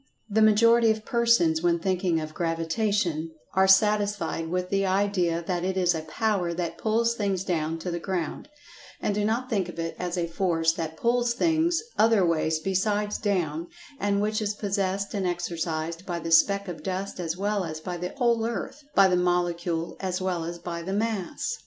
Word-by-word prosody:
The 220 0 +1
majority 230 +2 +5
of 220 0 0
persons, 230 -10 +3
when 170 -1 +2
thinking 180 -1 0
of 155 0 -6
"Gravitation," 165 0 -1 0.2
are 190 +1 +4
satisfied 200 -4 +2
with 180 +1 -2
the 195 0 +2
idea 185 -3 +1
that 175 -1 -1
it 190 +1 -1
is 180 -1 +3
a 160 - -3
power 175 +1 -1
that 170 -1 -4
"pulls 230 +1 +1
things 200 -5 -1
down 165 -3 -1
to 175 +2 -4
the 170 - -3
ground," 180 - -4 0.5
and 205 - -1
do 205 +1 0
not 230 +4 0
think 200 -8 -1
of 175 - -9
it 165 0 -3
as 180 0 -3
a 175 - +1
force 165 -1 +1
that 160 -1 -5
"pulls 240 +2 +1
things" 330 - +2 0.2
other 220 -4 +5
ways 160 -1 +1
besides 205 +4 0
"down," 170 -6 -1 0.3
and 200 0 +1
which 215 +1 0
is 210 -1 -1
possessed 200 -1 -1
and 195 -3 -1
exercised 170 -1 -3
by 175 -2 -3
the 165 0 -5
speck 200 +4 +4
of 175 -2 -6
dust 190 0 -4
as 170 -1 -3
well 205 0 0
as 155 -2 -5
by 175 +2 -5
the 180 +1 -4
whole 235 -3 +2
earth—by 235 -1 +1
the 185 - +2
molecule 175 -1 0
as 185 -1 -2
well 180 -3 -2
as 170 +1 -5
by 170 0 -5
the 190 +3 -4
mass. 220 - -2
185 Hz, 185 wpm, -26 LUFS, 170-210 Hz, 0.5 s, majority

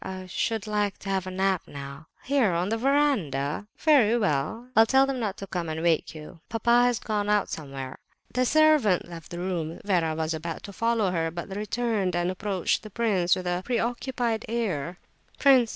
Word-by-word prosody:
I 185 0 -6
should 220 +3 -2
like 210 -2 -1
to 195 - -6
have 190 -1 -1
a - - -2
nap 190 -1 0
now." 140 +2 -9 0.2
"Here, 260 -9 +2
on 175 +3 0
the 225 - 0
verandah? 210 - +1
Very 250 -8 +4
well, 205 - -1
I'll 225 0 +7
tell 265 +2 +5
them 270 -1 -2
all - - -4
not 205 -3 -2
to 195 - -6
come 175 -4 -4
and 160 +1 -3
wake 165 -1 +1
you. 155 +2 -10
Papa 235 +1 +3
has 245 -1 +2
gone 210 -2 -2
out 210 -1 +2
somewhere." 135 -3 -6 0.3
The 255 - +2
servant 300 - +4
left 165 -2 -10
the 175 - -6
room. 175 -3 -3
Vera 170 -5 +1
was 160 0 -1
about 165 +1 -5
to 200 - -9
follow 230 -3 +1
her, 165 -2 0
but 175 +4 -6
returned 210 -3 -1
and 175 +1 0
approached 190 -1 -1
the 215 - -10
prince 200 -5 +2
with 185 - -5
a 180 0 -1
preoccupied 240 -1 -1
air. 185 -8 -2 0.4
"Prince!" 260 -5 +5
195 Hz, 195 wpm, -26 LUFS, 170-235 Hz, 0.4 s, I'll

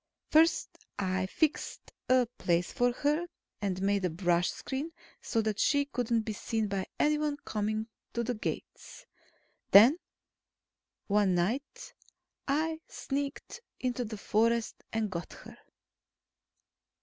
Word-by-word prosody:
First 320 +2 +3 0.2
I 190 -1 0
fixed 310 - -1 0.2
a 255 -1 +5
place 175 0 +1
for 245 0 +3
her, 300 +7 0 0.3
and 190 -2 -1
made 200 0 +2
a 180 - +2
brush 175 +1 +1
screen, 285 +5 -4 0.3
so 225 - 0
that 215 -1 -1
she 285 -1 +3
couldn't 240 -4 0
be 215 - -3
seen 220 +1 -1
by 195 -2 -2
anyone 300 -1 +2
coming 215 +1 -1 0.3
to 235 - 0
the 245 +2 -1
gates. 215 - -6 0.6
Then, 240 - +8 1.1
one 200 -3 +3
night, 225 +12 -2 0.5
I 315 +3 0
sneaked 280 +11 -4 0.2
into 250 -1 -1
the 215 -1 -6
forest 230 +2 +1
and 220 -2 -1
got 170 -1 -5
her. - - -12
225 Hz, 125 wpm, -31 LUFS, 200-280 Hz, 1.1 s, Then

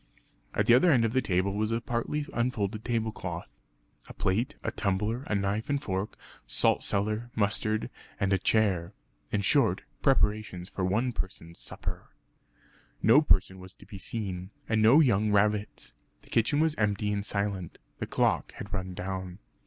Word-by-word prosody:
At - - +2
the 120 - +6
other 130 +9 +6
end 125 -7 +4
of 115 - -1
the 130 - +3
table 95 -1 0
was 105 +1 0
a 115 0 0
partly 120 +6 -2
unfolded 110 -3 -1
tablecloth, 110 -7 -3 0.6
a - - -11
plate, 115 +10 0
a - - -1
tumbler, 105 +4 -1
a 105 - 0
knife 100 +4 -1
and 140 0 +1
fork, 95 -5 -3 0.3
salt - - +3
cellar, 105 +4 -1
mustard 110 +1 +1 0.3
and 100 0 +2
a 95 - +2
chair 95 -5 +1 0.4
in 105 - +1
short, 110 -5 +3 0.2
preparations 105 -8 +1
for 95 - -4
one 110 +7 +1
person's 95 -6 -6
supper. - - -6 0.9
No 115 +8 +7
person 95 - +2
was 95 0 -12
to - - -16
be 100 -2 -10
seen, 95 -4 -4 0.2
and 110 -1 +2
no 120 +9 +7
young 105 -6 +3
rabbits. 105 +1 0 0.3
The - - -19
kitchen 120 +6 +2
was 160 -1 +3
empty 105 -1 +1
and 100 -1 -1
silent; 100 -4 -3 0.2
the - - -3
clock - - +1
had - - -8
run 95 -2 -4
down. 95 -1 -5
105 Hz, 165 wpm, -29 LUFS, 95-115 Hz, 0.9 s, No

